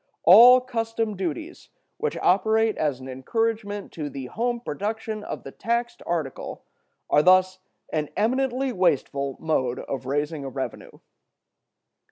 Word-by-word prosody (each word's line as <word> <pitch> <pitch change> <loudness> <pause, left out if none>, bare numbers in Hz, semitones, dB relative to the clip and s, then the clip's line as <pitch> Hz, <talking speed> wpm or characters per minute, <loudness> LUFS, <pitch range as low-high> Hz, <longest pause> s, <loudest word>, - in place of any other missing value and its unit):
All 240 +8 +9
custom 225 -3 -2
duties 315 - -5 0.3
which 460 - -2
operate 220 +4 +3
as 145 -4 -1
an 130 - -9
encouragement 205 - -2
to 150 -3 -5
the 135 -1 -7
home 240 - -2
production 215 +2 -4
of - - -6
the - - -8
taxed 235 +1 -2
article 160 -6 -4 0.4
are 150 - +4
thus 185 +2 +4 0.3
an 150 -2 -1
eminently 255 +4 0
wasteful 140 - 0
mode 130 -6 0
of 130 -2 -5
raising 145 +2 -2
a 135 - -5
revenue. 135 0 -6
195 Hz, 130 wpm, -25 LUFS, 145-230 Hz, 0.4 s, All